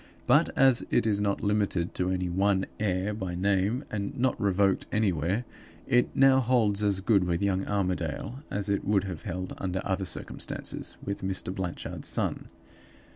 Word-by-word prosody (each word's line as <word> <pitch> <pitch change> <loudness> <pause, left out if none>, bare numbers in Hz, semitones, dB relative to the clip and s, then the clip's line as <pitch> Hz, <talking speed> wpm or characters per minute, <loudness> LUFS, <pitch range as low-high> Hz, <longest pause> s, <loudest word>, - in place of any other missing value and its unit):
But, - - +4
as 130 -2 +5
it - - +2
is 105 -2 +1
not 100 -1 0
limited 100 -4 0
to 90 0 -1
any 90 -1 -1
one 95 +2 +1
heir 100 -1 0
by 95 -4 -4
name, 100 +7 +1
and 100 -2 -3
not 130 0 0
revoked 100 -1 +2
anywhere, 95 +1 0 0.4
it 125 -2 +3
now 135 0 +6
holds 115 -5 +2
as 100 -2 +1
good 100 -1 +3
with 85 +2 -1
young 95 -1 0
Armadale 95 - -2
as 100 0 -2
it 100 -1 0
would 100 -2 +2
have 95 -5 -5
held 95 -2 -5
under 95 -1 -2
other 95 0 -1
circumstances 90 - -3
with 100 0 -3
Mr. 95 -1 -1
Blanchard's 95 -2 -4
son. - - 0
100 Hz, 165 wpm, -28 LUFS, 95-105 Hz, 0.4 s, now